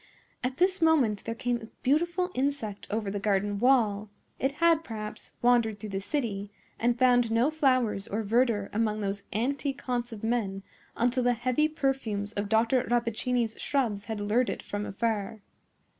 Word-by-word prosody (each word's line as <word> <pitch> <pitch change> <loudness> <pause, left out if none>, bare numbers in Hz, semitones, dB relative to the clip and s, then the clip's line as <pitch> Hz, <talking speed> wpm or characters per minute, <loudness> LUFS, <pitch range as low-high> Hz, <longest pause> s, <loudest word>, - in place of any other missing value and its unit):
At 255 +1 -2
this 370 0 +2
moment 275 -11 +3
there 230 - -3
came 240 0 -1
a 225 - -9 0.2
beautiful 345 +6 +1
insect 255 -7 -2
over 210 -2 -2
the 200 - -2
garden 200 0 0
wall; 215 -5 +3 0.3
it 270 +1 0
had, 330 +1 +3
perhaps, 215 -5 -7
wandered 235 -3 +3
through 210 0 -7
the 195 0 -2
city, 205 -5 -2 0.3
and 240 +1 +2
found 245 -2 +4
no 230 +6 +2
flowers 255 -9 +1
or 215 +2 -2
verdure 225 -1 +1
among 215 0 0
those 200 0 -2
antique 270 +5 -1
haunts 245 -1 -2
of 220 -2 -8
men 210 -4 -1 0.3
until 245 +2 +2
the 245 0 +3
heavy 255 +5 +1
perfumes 265 -9 -2
of 205 -1 -3
Dr. 230 +3 +3
Rappaccini's 235 0 0
shrubs 225 -8 0
had 220 -2 -4
lured 220 +5 +1
it - - -4
from 205 0 -4
afar. 215 0 -2
230 Hz, 165 wpm, -28 LUFS, 210-255 Hz, 0.3 s, found